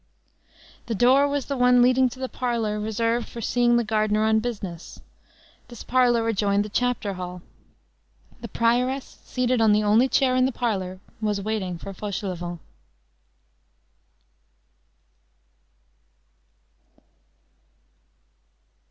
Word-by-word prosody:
_ - - -35
The 230 - -2
door 260 +6 +4
was 285 -2 -2
the 280 - -3
one 250 -1 +4
leading 255 +1 +4
to 250 - -12
the 260 0 -3
parlor 230 -5 -2
reserved 230 +2 -1
for 235 - -8
seeing 240 +1 +2
the 240 - +1
gardener 215 -1 +1
on 220 0 +3
business. 200 -7 -6 0.7
This 240 -3 -10
parlor 240 -2 +2
adjoined 205 -2 +1
the - - -7
chapter 245 -3 -1
hall. 180 -1 -7 1.0
The 235 - -7
prioress, 245 +5 -1
seated 250 -1 0
on 220 -2 +5
the 210 0 +2
only 220 +5 +3
chair 255 -2 +2
in 255 0 +3
the - - -2
parlor, 190 -7 -3 0.2
was 210 -2 0
waiting 200 -4 -3
for 195 +4 -8
Fauchelevent. 180 -4 -5
230 Hz, 115 wpm, -24 LUFS, 205-250 Hz, 1.0 s, on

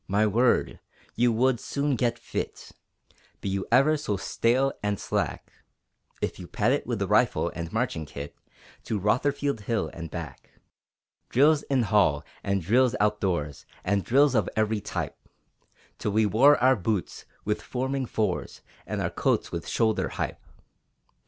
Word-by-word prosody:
My 100 +3 +2
word, 115 +4 +2 0.3
you 120 +1 +3
would 125 +2 +2
soon 140 +1 -1
get 120 0 0
fit, - - -5 0.7
Be 100 - -3
you 95 0 -2
ever 140 +6 +5
so 105 -9 -2
stale 125 +7 +1
and 105 -1 -1
slack, - - -2 0.7
If - - -2
you - - -8
pad - - +1
it - - 0
with - - -1
rifle - - +2
and 85 0 -5
marching 110 - -2
kit 70 +1 -8 0.5
To 110 - -1
Rotherfield 140 +5 0
Hill 110 +1 -2
and 85 -1 -7
back! 80 -5 -8 0.8
Drills 145 +4 +4
in 135 -3 +2
hall, 95 -8 +3 0.2
and 100 -2 0
drills 125 +7 +3
outdoors, 95 -9 -1 0.2
And 100 0 +1
drills 140 +2 +4
of 110 -6 +2
every 110 0 +1
type, - - -4 0.8
Till 105 - -2
we 110 +1 +3
wore 130 +8 +5
our 130 +1 +4
boots 105 -2 -3 0.2
with 105 0 -1
forming 130 +1 -2
fours, 110 -2 -2 0.3
And - - -2
our - - -1
coats - - 0
with 85 -1 -5
"Shoulder 110 -2 +1
hipe!" - - -3
110 Hz, 150 wpm, -27 LUFS, 100-130 Hz, 0.8 s, ever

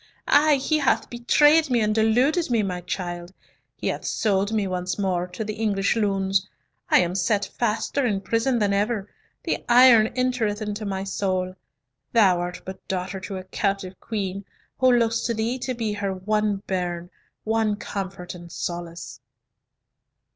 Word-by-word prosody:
Ay, 300 0 +5
he 305 +3 +1
hath 280 - +1
betrayed 295 +6 +4
me, 245 -2 +2
and 215 -1 +1
deluded 250 +10 +2
me, 230 -3 +2
my 180 -2 -3
child; 175 -1 -5 0.4
he - - -8
hath - - -3
sold 200 -1 0
me 215 -2 +1
once 180 -1 -3
more 185 -3 0
to 180 +5 -5
the 215 0 -4
English 205 -2 0
loons! 195 -3 0 0.4
I - - +6
am 175 0 -1
set 200 +2 +1
faster 235 +4 0
in 205 -6 0
prison 230 +5 +1
than 205 -3 +1
ever, 205 0 -1 0.3
the - - -2
iron 240 -3 +7
entereth 250 -5 0
into 210 0 -4
my 195 -1 -2
soul. 185 -1 -2 0.6
Thou 195 -6 +5
art 175 0 -5
but 190 0 -9
daughter 190 +1 -3
to 195 0 -6
a 185 - -6
captive 195 -1 -2
queen, 200 -3 -4 0.4
who 255 -1 +5
looks 230 -2 +2
to 235 - -1
thee 230 +4 -1
to 255 0 -3
be 225 -3 -2
her 200 -2 -2
one 205 +1 -1
bairn, 175 -2 -3 0.3
one 220 -1 +1
comfort 195 -3 -6
and 175 -1 -11
solace." 170 -7 -6
205 Hz, 160 wpm, -24 LUFS, 185-230 Hz, 0.6 s, iron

